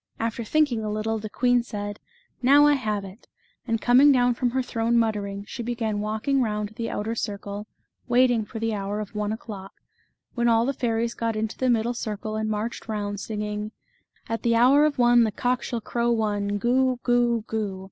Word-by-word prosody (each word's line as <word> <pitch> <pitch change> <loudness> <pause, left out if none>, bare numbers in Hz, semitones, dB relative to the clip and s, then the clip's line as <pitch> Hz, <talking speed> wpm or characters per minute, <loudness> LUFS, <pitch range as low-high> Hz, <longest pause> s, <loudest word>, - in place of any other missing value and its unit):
After 230 +1 -2
think 305 +5 +2
ing 225 -2 -2
a 215 - -2
little, 215 +1 -2
the 215 0 -6
queen 245 +2 +2
said, 205 -3 -6 0.2
" 485 - -41
Now 290 +1 +8
I 295 - +5
have 215 -7 -1
it," 195 +4 -13 0.4
and 225 -1 0
coming 255 +5 +6
down 245 -2 +3
from 245 +1 0
her 260 +2 -1
throne 235 -1 0
muttering, 205 -3 -1
she 245 - -6
began 230 -3 -2
walking 220 +6 0
round 210 -3 -1
the 230 +2 -5
outer 220 +2 -3
circle, 205 -1 -5 0.4
waiting 245 -2 +3
for 215 - -9
the 225 0 -1
hour 200 0 -3
of 210 -1 -6
one 210 0 -2
o'clock, 205 -3 -7 0.6
when 240 -1 +1
all 230 0 +4
the 275 - 0
fairies 235 -2 -1
got 230 -1 -2
into 220 0 -2
the 255 - 0
middle 235 0 +2
circle 215 -2 -4
and 215 0 -1
marched 215 +2 -3
round, 205 -2 -3
singing: 210 0 -4 0.5
"At 225 0 -3
the 235 -1 +2
hour 265 +6 +6
of 300 -2 0
one 240 -1 +5
The 220 - +1
cock 245 +3 0
shall 235 -2 -4
crow 235 +2 -1
one, 205 -3 0
Goo! 255 +3 +2
Goo! 240 -1 +2
Goo! 210 -4 -3
225 Hz, 200 wpm, -25 LUFS, 210-245 Hz, 0.6 s, Now